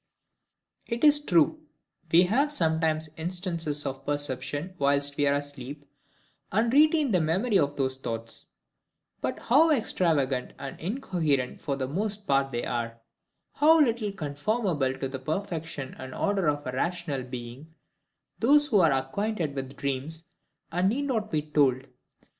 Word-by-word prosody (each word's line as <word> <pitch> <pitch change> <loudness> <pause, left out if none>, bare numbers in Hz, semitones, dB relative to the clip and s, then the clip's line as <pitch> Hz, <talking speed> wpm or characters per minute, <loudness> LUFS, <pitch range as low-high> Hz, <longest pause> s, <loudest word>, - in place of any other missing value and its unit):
It 235 +2 -3
is 295 -1 +8
true, 175 - +3 0.5
we 170 +2 +7
have 265 +11 +2
sometimes 160 - +1
instances 165 -3 -2
of 135 -1 -4
perception 145 +4 -3
whilst 140 0 +2
we 145 0 +2
are 140 - +3
asleep, 145 0 -5 0.7
and 230 +4 +1
retain 305 -1 +4
the 180 -4 +3
memory 190 +7 +2
of 145 -2 0
those 130 -2 -1
thoughts: 115 -3 -5 0.7
but - - -2
how 300 +7 +4
extravagant 160 - +1
and 140 0 -7
incoherent 165 - -1
for 140 -3 -2
the 135 -1 -3
most 205 +7 -3
part 135 -2 +2
they 120 -1 -2
are; 115 -1 -3 0.5
how 320 +2 +5
little 230 -7 +2
conformable 150 - -1
to 135 - -3
the 135 0 -6
perfection 155 -2 -4
and 130 0 -8
order 195 -5 +1
of 145 0 -2
a 125 - -3
rational 155 0 -2
being, 125 +5 -9 0.6
those 290 +5 +5
who 230 -9 +3
are 165 -4 +5
acquainted 155 +5 -1
with 135 0 -6
dreams 140 +4 -3 0.6
need 230 +9 +2
not 220 -6 -1
be 155 -5 -1
told. 140 -4 +2
155 Hz, 140 wpm, -27 LUFS, 135-205 Hz, 0.7 s, is